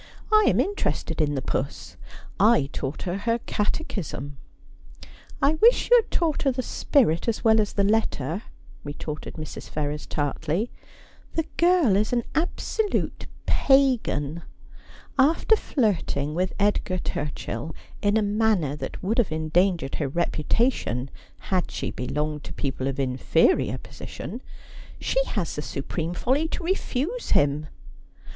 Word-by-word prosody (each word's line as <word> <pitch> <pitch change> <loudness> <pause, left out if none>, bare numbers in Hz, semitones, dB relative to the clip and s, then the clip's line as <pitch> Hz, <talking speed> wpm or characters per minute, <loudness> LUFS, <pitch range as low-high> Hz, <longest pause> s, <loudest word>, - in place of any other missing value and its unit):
' - - -22
I - - +2
am - - +3
interested 405 - -1
in 145 -1 +1
the 135 - -2
puss. 140 - -3 0.4
I 200 -10 +5
taught 135 +1 -4
her 180 +1 -2
her 230 +2 +1
Cate 235 +7 -2
chism.' 145 -7 -5 0.6
' - - -18
I 280 +3 +5
wish 475 +2 +5
you - - +9
had - - -20
taught 325 -4 0
her 275 - +3
the 255 0 -2
spirit 235 - +2
as 230 -1 -1
well 220 -1 +5
as 205 - -2
the 200 - +2
letter, 195 -6 0 0.2
' - - -23
retorted 145 +1 -6
Mrs. 155 -2 -7
Ferrers 150 0 -3
tartly. 160 - -1 0.3
' - - -27
The 325 - +1
girl 340 - +4
is 210 +2 +1
an 240 -1 +2
absolute 400 +5 -1 0.2
pagan. 230 - +2 0.8
After 320 +10 +5
flirting 180 - 0
with 180 +3 -1
Edgar 200 -2 +1
Turchill 150 -1 -4 0.3
in 205 +1 +3
a 220 - +2
manner 205 -8 +1
that 150 - -6
would 220 +6 +1
have 220 -9 +2
endangered 160 -1 +1
her 145 - +1
reputation 155 - 0 0.4
had 185 -2 +1
she - - -3
belonged 150 +3 -3
to - - -7
people 135 -1 -2
of 135 - -1
infe 130 -2 -2 0.3
rior - - -2
position, 235 +8 -8 0.6
she - - +1
has 200 - -2
the 150 - -3
supreme 165 +4 -4
folly 280 - +1
to 335 - -4
refuse 375 - -2
him.' 145 +1 +2
190 Hz, 150 wpm, -25 LUFS, 150-250 Hz, 0.8 s, you